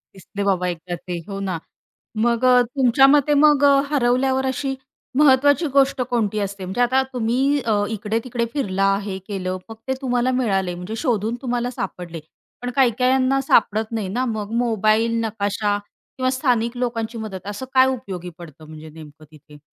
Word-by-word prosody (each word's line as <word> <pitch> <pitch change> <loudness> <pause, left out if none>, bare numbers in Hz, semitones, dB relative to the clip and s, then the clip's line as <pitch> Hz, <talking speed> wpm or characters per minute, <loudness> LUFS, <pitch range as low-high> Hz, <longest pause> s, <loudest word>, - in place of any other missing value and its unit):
दिसले 200 +2 -6
बाबा 180 -2 +1
एकदा 175 +2 -6
ते. 175 +1 -6
हो 195 0 -5
ना 175 -3 -2 0.7
मग 235 0 +1
अ, 250 -1 +6 0.2
तुमच्या 265 +1 +5
मते 295 0 +2
मग 295 -2 +4
अ, 280 -1 +5
हरवल्यावर 265 0 +1
अशी 270 +1 -3 0.4
महत्त्वाची 285 +2 +4
गोष्ट 275 -1 +3
कोणती 215 -3 0
असते? 200 -1 -4
म्हणजे 190 +7 -2
आता 255 +2 +3
तुम्ही 255 +4 +1
अ, 225 -3 0 0.2
इकडे-तिकडे 225 +3 -2
फिरला, 195 -8 0
हे 195 -2 -4
केलं 185 -3 -3
मग 225 - -8
ते 265 - +1
तुम्हाला 250 -1 0
मिळाले. 190 -6 0
म्हणजे 180 +5 -6
शोधून 225 -2 0
तुम्हाला 245 -1 -1
सापडले. 170 -2 -5 0.4
पण 245 - -3
काही-काहीना 260 +1 +2
सापडत 220 -4 +2
नाही 220 -4 -2
ना. 255 - +1
मग 210 -1 -5
मोबाईल, 225 0 +1
नकाशा 205 -1 -1 0.4
किंवा 255 0 +1
स्थानिक 245 -3 0
लोकांची 235 -2 -3
मदत. 200 -4 -7
असं 205 +5 -5
काय 260 0 +6
उपयोगी 195 -9 -4
पडतं 155 -2 -13
म्हणजे 155 0 -11
नेमकं 155 -1 -13
तिथे? 150 -1 -17
230 Hz, 160 wpm, -21 LUFS, 195-255 Hz, 0.7 s, अ